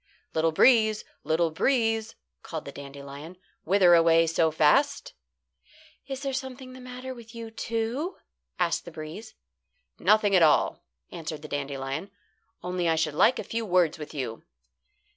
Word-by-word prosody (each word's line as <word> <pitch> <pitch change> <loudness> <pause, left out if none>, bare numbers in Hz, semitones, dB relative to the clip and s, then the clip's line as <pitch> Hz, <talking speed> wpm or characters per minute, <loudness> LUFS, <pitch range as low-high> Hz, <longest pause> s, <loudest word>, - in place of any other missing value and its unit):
"Little 160 +1 +2
breeze, 220 +3 +4 0.2
little 165 +1 +1
breeze," 225 - +1 0.3
called 160 -2 -6
the 140 - -7
dandelion, 140 +4 -10 0.3
"whither 185 0 +5
away 165 0 +5
so 165 0 +2
fast?" 280 - +2 0.9
"Is 270 0 -5
there 275 -1 -2
something 260 -1 -6
the 260 - -11
matter 255 +1 -7
with 235 -2 -13
you 230 -1 -7
too?" 230 - -3 0.4
asked 175 -2 0
the 170 - -9
breeze. 160 +8 -9 0.6
"Nothing 210 -2 +4
at 180 - +5
all," 155 -2 +3 0.3
answered 155 -2 -6
the - - -6
dandelion. 140 +4 -4 0.5
"Only 180 -1 -1
I 165 - +3
should 160 -2 0
like 235 - +4
a - - -3
few 230 0 -3
words 180 -6 +2
with 150 -1 -7
you." 130 -6 -5
180 Hz, 145 wpm, -27 LUFS, 155-230 Hz, 0.9 s, whither